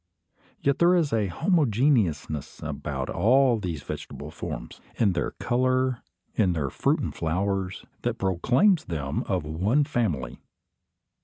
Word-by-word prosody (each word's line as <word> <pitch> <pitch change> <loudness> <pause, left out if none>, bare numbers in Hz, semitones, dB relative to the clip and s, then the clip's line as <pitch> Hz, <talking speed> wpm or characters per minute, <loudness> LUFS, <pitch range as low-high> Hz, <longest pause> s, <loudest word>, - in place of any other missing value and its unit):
Yet 140 0 +1
there 175 +1 +5
is 160 -7 +1
a 110 -3 +2
homogeneousness 115 - +1
about - - -4
all 125 +1 +4
these 85 -7 -4
vegetable - - -7
forms, - - -7
in 100 -5 +2
their 85 - -1
colour, 130 0 +1 0.3
in 95 -5 +2
their 70 -5 -2
fruit - - +1
and - - -3
flowers, 95 +3 -2 0.2
that - - -1
proclaims 130 - +2
them 75 -4 -2
of 90 -4 0
one 95 - +1
family. 110 - -2
105 Hz, 130 wpm, -26 LUFS, 85-130 Hz, 0.3 s, there